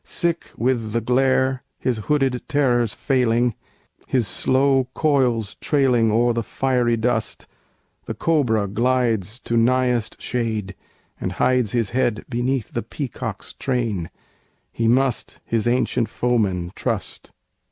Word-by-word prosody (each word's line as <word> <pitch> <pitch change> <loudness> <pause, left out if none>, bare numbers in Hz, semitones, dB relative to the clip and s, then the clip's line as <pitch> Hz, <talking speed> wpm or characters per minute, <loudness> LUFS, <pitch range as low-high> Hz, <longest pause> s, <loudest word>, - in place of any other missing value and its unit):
Sick 170 -2 -1
with 115 -3 0
the 115 - +2
glare, 130 +2 +2 0.2
his 125 -4 -1
hooded 135 -4 +1
terrors 125 -6 +2
failing, 120 -3 +1 0.5
His 125 -5 +1
slow 135 +2 +2
coils 125 -8 +1
trailing 125 -6 +2
o'er 120 +2 +3
the 115 - -1
fiery 120 0 0
dust, 120 +2 -1 0.6
The - - -5
cobra 120 -11 +1
glides 115 -1 0
to 115 - -2
nighest 125 -1 +1
shade, 110 -5 -2 0.5
and - - -3
hides 125 -5 +1
His 115 -4 0
head 120 -3 0
beneath 125 0 -1
the - - -1
peacock's - - -6
train: 115 -10 -2 0.6
he 115 - -1
must 130 +1 +1
His 115 0 0
ancient 120 -1 +1
foeman 100 -8 0
trust! - - -4
120 Hz, 120 wpm, -22 LUFS, 115-130 Hz, 0.6 s, o'er